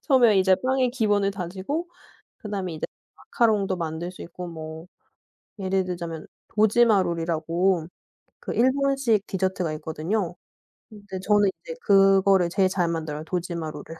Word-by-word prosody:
처음에 245 -8 +5
이제 190 0 +5
빵의 260 -1 +2
기본을 205 -5 +1
다지고 195 - -4 0.5
그 215 - -8
다음에 185 -5 -3
이제 155 - -4 0.3
마카롱도 210 -5 +1
만들 165 0 -4
수 - - -10
있고 180 +1 -8
뭐 160 0 -8 0.7
예를 190 0 0
들자면 170 -3 -5 0.2
도지마 215 -1 +4
롤이라고 170 +1 0 0.5
그 - - -5
일본식 260 -4 +2
디저트가 185 -3 -1
있거든요. 165 +5 -3 0.6
근데 205 -3 -8
저는 205 0 +3 0.2
인제 485 -1 -7
그거를 195 -2 +5
제일 190 +1 +2
잘 180 -2 0
만들어요 155 -2 -3
도지마 170 -2 -3
롤을. 150 -1 -9
190 Hz, 315 characters per minute, -25 LUFS, 170-210 Hz, 0.7 s, 처음에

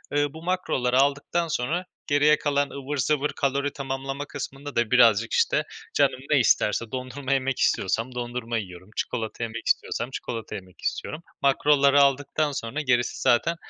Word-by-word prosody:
eee, 145 0 +3
bu 160 +1 -10
makroları 130 -9 0
aldıktan 145 +5 +1
sonra 160 +5 -1 0.2
geriye 145 +1 +4
kalan 145 -1 0
ıvır 140 +1 -5
zıvır 150 +2 +1
kalori 140 0 -1
tamamlama 135 0 -4
kısmında 145 0 -7
da 120 -2 +1
birazcık, 115 -3 +5
işte, - - +2 0.3
canım 140 -2 +2
ne 145 - +5
isterse. 110 -1 +2
Dondurma 130 +1 -3
yemek 135 -1 0
istiyorsam 115 +6 0
dondurma 120 -1 -3
yiyorum, 90 -2 -7
çikolata 115 -1 -3
yemek 115 0 -5
istiyorsam 120 +2 0
çikolata 115 -4 -5
yemek 95 -1 -11
istiyorum. 155 - -3 0.2
Makroları 140 0 +4
aldıktan 145 +2 +2
sonra 130 +3 -3
gerisi 125 -3 0
zaten, 125 +8 +3
135 Hz, 150 wpm, -25 LUFS, 120-145 Hz, 0.3 s, birazcık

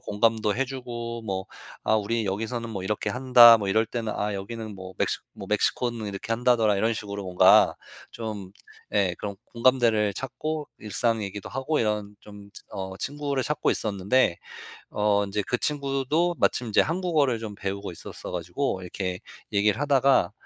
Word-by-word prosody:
공감도 110 0 +1
해 135 - +1
주고 120 -3 -6
뭐 95 -3 -3 0.4
"아 - - +2
우리 110 +2 -1
여기서는 115 +4 -3
뭐 95 -4 -5
이렇게 105 +2 -2
한다. 125 -2 +8
뭐 100 -2 -3
이럴 110 +3 +3
때는 115 -2 -3
아 105 0 -1
여기는 110 +2 -6
뭐 95 -1 -9
멕시 - - 0
뭐 - - -9
멕시코는 120 -3 0
이렇게 100 +2 -4
한다더라." 115 -3 +3
이런 110 +4 +1
식으로 100 -2 -5
뭔가 90 -1 +5 0.4
좀 105 -4 -6 0.4
예 95 -4 +2
그런 100 -1 -5
공감대를 115 -4 +2
찾고 150 +5 -4 0.2
일상 110 +2 0
얘기도 100 0 -6
하고 135 +4 -1
이런 105 -2 -1
좀 100 -1 -13 0.2
어 95 -1 -5
친구를 145 -1 -2
찾고 150 0 0
있었는데 100 -1 +1 0.6
어 105 -1 +2
인제 100 +1 -2
그 125 - 0
친구도 145 +5 0
마침 125 - +1
인제 110 - +4
한국어를 160 -7 +1
좀 110 -2 -6
배우고 100 0 -4
있었어 85 - -8
가지고 90 - -2
이렇게 90 0 -4 0.3
얘기를 105 +2 +2
하다가 135 -9 +3
110 Hz, 335 characters per minute, -26 LUFS, 100-125 Hz, 0.6 s, 한다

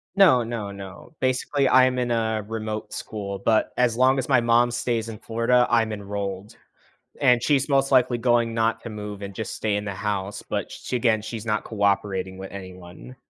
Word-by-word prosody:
No, 165 -12 +6
no, 110 -3 -4
no. 100 - -11
Basically, 130 +1 +1
I'm 130 0 +5
in 120 -1 -1
a 110 -2 0
remote 110 -1 -5
school, 105 -4 -5
but 110 +2 +2
as 120 -2 +2
long 130 +2 +4
as 130 - -3
my 130 -4 +4
mom 120 +1 +3
stays 120 -1 -1
in 110 -2 -8
Florida, 115 +2 +2
I'm 115 -2 +2
enrolled, 100 -1 -5 0.6
and 125 -4 +4
she's 140 -1 +2
most 135 0 +2
likely 125 -2 +3
going 120 -1 +2
not 115 0 0
to 115 - -7
move, 105 -1 -7
and 100 -1 -7
just 110 - -5
stay 105 -2 -1
in 105 - -3
the 100 - -3
house, 100 -1 -3
but, - - -4
sh - - -9
again, 115 -3 +2
she's 115 0 -6
not 105 -1 0
cooperating 100 -3 -1
with 95 0 -8
anyone. 95 +5 -10
115 Hz, 190 wpm, -24 LUFS, 100-125 Hz, 0.6 s, No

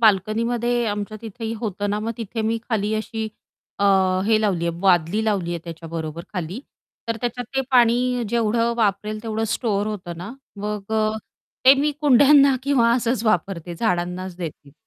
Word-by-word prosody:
बाल्कनीमध्ये 230 +3 +2
आमच्या 205 +1 -3
तिथेही 225 0 -5
होतं 205 -2 -2
ना 210 - 0
मग 220 +2 -2
तिथे 225 0 -4
मी 225 +1 0
खाली 215 -3 0
अशी 220 0 -3 0.5
अ 200 - +1 0.4
हे 220 -1 +4
लावली 185 -6 0
आहे, 170 0 -2
बादली 185 +2 +3
लावली 195 -6 0
आहे 170 - -2
त्याच्याबरोबर 165 -1 -6
खाली. 180 +3 -4 0.5
तर 230 - 0
त्याच्यात 245 0 -3
ते - - +4
पाणी 245 0 +3
जेवढं 230 +1 +1
वापरेल, 215 -1 0
तेवढं 225 -1 -2
स्टोअर 210 -4 -1
होतं 185 -5 -5
ना 180 +7 -7 0.2
मग 210 0 -4
अ, 215 0 +1 0.5
ते 265 +1 +9
मी 295 +1 +1
कुंड्यांना 280 0 +6
किंवा 260 -4 +3
असंच 235 -1 0
वापरते, 180 -4 0
झाडांनाच 180 -1 -2
देते. 155 -5 -8
215 Hz, 155 wpm, -22 LUFS, 190-235 Hz, 0.5 s, ते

